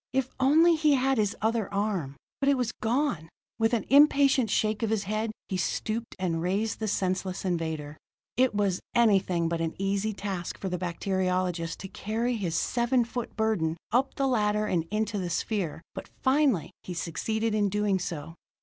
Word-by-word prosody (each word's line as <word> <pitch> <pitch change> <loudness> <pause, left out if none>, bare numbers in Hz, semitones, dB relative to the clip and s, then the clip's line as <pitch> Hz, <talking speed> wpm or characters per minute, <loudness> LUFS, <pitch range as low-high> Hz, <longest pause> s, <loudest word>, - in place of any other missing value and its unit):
If 260 -1 0
only 315 +6 +5
he 305 -2 +3
had 265 -1 +2
his 205 -2 +1
other 220 -2 0
arm! 195 -9 -1 0.2
But 275 - +2
it 280 - +3
was 245 -2 0
gone; 230 - -1 0.3
with 225 +1 +3
an 220 - -2
impatient 275 -4 +5
shake 215 +1 +1
of 225 - 0
his 215 -2 0
head 215 +3 -2 0.2
he 190 - -2
stooped 220 +6 -2
and 170 -3 -1
raised 200 +5 -1
the 220 - -2
senseless 185 -1 -1
invader. 160 -4 -2 0.4
It 255 -3 +2
was 200 -3 +1 0.2
anything 195 -7 +3
but 165 0 -1
an 165 -1 -2
easy 195 +2 0
task 195 -4 -4
for 190 - -4
the 180 -1 -3
bacteriologist 180 -1 -1
to 190 - -6
carry 220 +4 -2
his 180 -7 -2
seven 240 +5 +1
foot 240 0 -5
burden 195 -8 0
up 255 +4 +1
the 275 - 0
ladder 210 -4 +1
and 170 -5 0
into 210 0 -1
the 180 -2 -3
sphere, 170 -2 -2
but - - -7 0.2
finally, 260 - +2
he 180 - -7
succeeded 220 +7 -2
in 205 -1 +2
doing 205 -1 +1
so. 165 -3 -5
210 Hz, 175 wpm, -28 LUFS, 180-235 Hz, 0.4 s, only